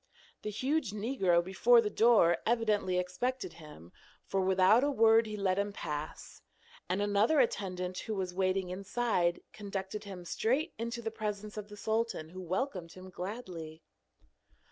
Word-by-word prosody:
The 210 Hz, -, -4 dB
huge 260 Hz, +2 st, -1 dB
negro 200 Hz, -6 st, +2 dB
before 210 Hz, +7 st, +5 dB
the 210 Hz, -2 st, 0 dB
door 215 Hz, -8 st, +5 dB
evidently 215 Hz, -5 st, +1 dB
expected 180 Hz, +4 st, -2 dB
him, 150 Hz, -, -13 dB, 0.3 s
for 195 Hz, -, 0 dB
without 190 Hz, +5 st, +4 dB
a 290 Hz, -, +2 dB
word 225 Hz, -3 st, +5 dB
he 215 Hz, 0 st, -5 dB
let 195 Hz, -1 st, +1 dB
him 200 Hz, 0 st, -1 dB
pass, 150 Hz, -5 st, -6 dB, 0.5 s
and 195 Hz, +3 st, +1 dB
another 205 Hz, +9 st, +3 dB
attendant 185 Hz, -6 st, -1 dB
who 220 Hz, -, -4 dB
was 185 Hz, -2 st, -3 dB
waiting 185 Hz, 0 st, 0 dB
inside 190 Hz, -2 st, 0 dB
conducted 200 Hz, 0 st, -5 dB
him 185 Hz, -3 st, -8 dB
straight 265 Hz, -, 0 dB
into 235 Hz, +1 st, -4 dB
the 225 Hz, -, -2 dB
presence 210 Hz, -1 st, -4 dB
of 210 Hz, -1 st, -6 dB
the 210 Hz, -, -10 dB
sultan, 220 Hz, -7 st, -1 dB
who 185 Hz, +2 st, -8 dB
welcomed 185 Hz, -1 st, -3 dB
him 185 Hz, 0 st, -11 dB
gladly. 180 Hz, -5 st, -7 dB
200 Hz, 150 wpm, -32 LUFS, 180-225 Hz, 0.5 s, before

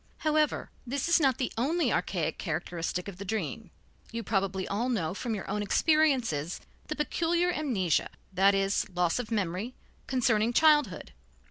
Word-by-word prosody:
However, 305 Hz, -1 st, +1 dB, 0.2 s
this 275 Hz, +4 st, -1 dB
is 340 Hz, -, +5 dB
not 270 Hz, -5 st, +3 dB
the 255 Hz, -, -2 dB
only 290 Hz, +1 st, +1 dB
archaic 170 Hz, -5 st, -1 dB
characteristic 170 Hz, +1 st, -3 dB
of 195 Hz, -3 st, -7 dB
the 200 Hz, -, -6 dB
dream. 210 Hz, +1 st, -3 dB, 0.4 s
You 230 Hz, 0 st, -4 dB
probably 195 Hz, -2 st, -1 dB
all 230 Hz, +6 st, -1 dB
know 185 Hz, -9 st, -1 dB
from 225 Hz, +2 st, -3 dB
your 200 Hz, -, -6 dB
own 210 Hz, +1 st, -2 dB
experiences 245 Hz, -, +2 dB, 0.3 s
the 305 Hz, -, -3 dB
peculiar 340 Hz, +3 st, +1 dB
amnesia, 215 Hz, -, 0 dB, 0.2 s
that 195 Hz, +2 st, +4 dB
is, 195 Hz, 0 st, +1 dB
loss 180 Hz, +2 st, 0 dB
of 245 Hz, -, -4 dB
memory, 205 Hz, +2 st, -2 dB, 0.3 s
concerning 235 Hz, -3 st, +2 dB
childhood. 295 Hz, -, +3 dB
220 Hz, 150 wpm, -29 LUFS, 190-275 Hz, 0.4 s, is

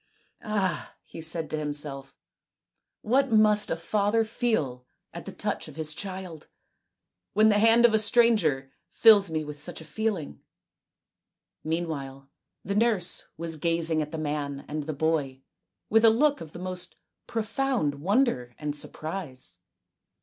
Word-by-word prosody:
" -, -, -49 dB
Ah! 195 Hz, -7 st, -2 dB
" -, -, -55 dB
he 165 Hz, -, -6 dB
said 160 Hz, 0 st, -1 dB
to 155 Hz, -, -1 dB
himself, 145 Hz, -2 st, -4 dB, 0.4 s
" -, -, -58 dB
what 270 Hz, 0 st, +3 dB
must 215 Hz, -1 st, +4 dB
a -, -, 0 dB
father 205 Hz, +6 st, +1 dB
feel 215 Hz, -, -1 dB, 0.3 s
at -, -, -8 dB
the -, -, -4 dB
touch -, -, -3 dB
of -, -, -11 dB
his 155 Hz, -1 st, -3 dB
child, 185 Hz, -3 st, -7 dB, 0.9 s
when 215 Hz, +2 st, +5 dB
the 205 Hz, -1 st, +3 dB
hand 230 Hz, +2 st, +6 dB
of 235 Hz, -, +5 dB
a 220 Hz, -, +4 dB
stranger 210 Hz, -, +3 dB, 0.2 s
fills 205 Hz, -4 st, +6 dB
me 155 Hz, -1 st, -2 dB
with 150 Hz, -1 st, -7 dB
such -, -, -2 dB
a 160 Hz, -, -11 dB
feeling! 185 Hz, -, -3 dB, 0.6 s
" -, -, -60 dB
Meanwhile 140 Hz, -5 st, -4 dB, 0.3 s
the 200 Hz, -, -2 dB
nurse 210 Hz, -4 st, +1 dB
was 165 Hz, 0 st, -3 dB
gazing 165 Hz, 0 st, +1 dB
at 150 Hz, 0 st, -5 dB
the 160 Hz, -, -4 dB
man 145 Hz, -2 st, -3 dB
and 150 Hz, 0 st, -4 dB
the 155 Hz, -, -2 dB
boy 145 Hz, -3 st, -1 dB, 0.4 s
with 225 Hz, +1 st, +3 dB
a 225 Hz, -, +9 dB
look 285 Hz, +6 st, +2 dB
of 160 Hz, -2 st, -8 dB
the -, -, -8 dB
most 180 Hz, 0 st, -4 dB, 0.3 s
profound 225 Hz, -, -1 dB
wonder 180 Hz, -, +1 dB
and 150 Hz, -1 st, -3 dB
surprise. 145 Hz, -, -5 dB
165 Hz, 155 wpm, -27 LUFS, 150-215 Hz, 0.9 s, a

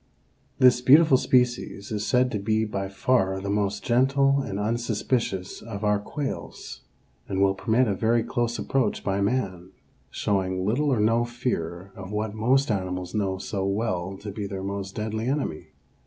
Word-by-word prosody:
_) -, -, -38 dB, 0.5 s
This 125 Hz, -1 st, +5 dB
beautiful 145 Hz, +3 st, +7 dB
species 125 Hz, -5 st, +1 dB
is 105 Hz, -1 st, -2 dB
said 125 Hz, 0 st, +3 dB
to 105 Hz, -, -2 dB
be 110 Hz, +2 st, +1 dB
by 100 Hz, -2 st, -3 dB
far 95 Hz, -1 st, +1 dB
the 100 Hz, +1 st, -3 dB
most 105 Hz, 0 st, -1 dB
gentle 135 Hz, +3 st, +3 dB
and 100 Hz, -7 st, -4 dB
unsuspicious 110 Hz, -2 st, -1 dB
of 110 Hz, -2 st, -7 dB
our 105 Hz, -1 st, +2 dB
quails, 140 Hz, +7 st, -6 dB, 0.5 s
and 95 Hz, -, -1 dB
will 100 Hz, 0 st, +4 dB
permit 115 Hz, +5 st, +1 dB
a 100 Hz, -, +1 dB
very 115 Hz, +3 st, +2 dB
close 120 Hz, 0 st, -1 dB
approach 135 Hz, -3 st, 0 dB
by 95 Hz, 0 st, 0 dB
man, 95 Hz, -5 st, -2 dB, 0.4 s
showing 95 Hz, -2 st, -1 dB
little 135 Hz, +8 st, +1 dB
or 125 Hz, -, +2 dB
no 115 Hz, +3 st, +3 dB
fear 100 Hz, -7 st, -3 dB
of 95 Hz, 0 st, -8 dB
what 105 Hz, 0 st, -2 dB
most 125 Hz, +4 st, +2 dB
animals 90 Hz, -2 st, -3 dB
know 95 Hz, -3 st, 0 dB
so 95 Hz, +1 st, -3 dB
well 95 Hz, -2 st, -2 dB
to 105 Hz, +1 st, -7 dB
be 100 Hz, 0 st, -4 dB
their 95 Hz, -1 st, -5 dB
most 100 Hz, 0 st, -4 dB
deadly 110 Hz, +1 st, -3 dB
enemy. 130 Hz, -, -2 dB
105 Hz, 170 wpm, -25 LUFS, 95-120 Hz, 0.5 s, beautiful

